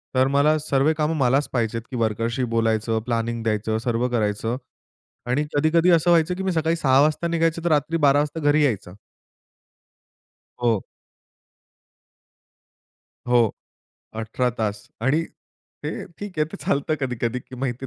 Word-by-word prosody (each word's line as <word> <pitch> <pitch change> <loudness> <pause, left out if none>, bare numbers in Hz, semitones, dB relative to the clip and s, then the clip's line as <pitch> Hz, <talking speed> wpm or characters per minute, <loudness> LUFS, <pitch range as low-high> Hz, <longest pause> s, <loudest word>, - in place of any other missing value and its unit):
तर 130 +1 +4
मला 150 +2 +4
सर्वे 145 0 +2
काम 150 +1 +1
मलाच 135 +2 +2
पहायचेत, 115 -2 -1
की - - -4
वर्कर्सशी 115 +2 -1
बोलायचं, 110 0 +1
प्लॅनिंग 115 -1 -2
द्यायचं, 110 0 0
सर्व 120 0 +1
करायचं. 110 0 -1 0.7
आणि 125 +5 0
कधी-कधी 160 +4 +3
असं 170 +1 +4
व्हायचं 170 +1 +3
की 190 - -4
मी 190 - 0
सकाळी 160 -1 +1
6:00 135 -5 +3
वाजता 155 +3 +1
निघायचं, 165 0 0
तर - - +3
रात्री 150 +2 +1
12:00 140 +1 +5
वाजता 150 +2 -2
घरी 150 +1 +4
यायचं. 105 -10 -1 1.7
हो. 115 -4 +2 2.5
हो, 120 0 +4 0.8
18 115 +3 -1
तास. 105 -2 -2
आणि 135 +7 +2 0.6
ते 150 - -1 0.3
ठीक 200 -5 -7
आहे 155 - +3
ते - - -5
चालतं 145 +3 0
कधी-कधी. 125 -2 -2 0.2
माहिती 130 0 -3
आहे - - -3
130 Hz, 140 wpm, -23 LUFS, 115-155 Hz, 2.5 s, 12:00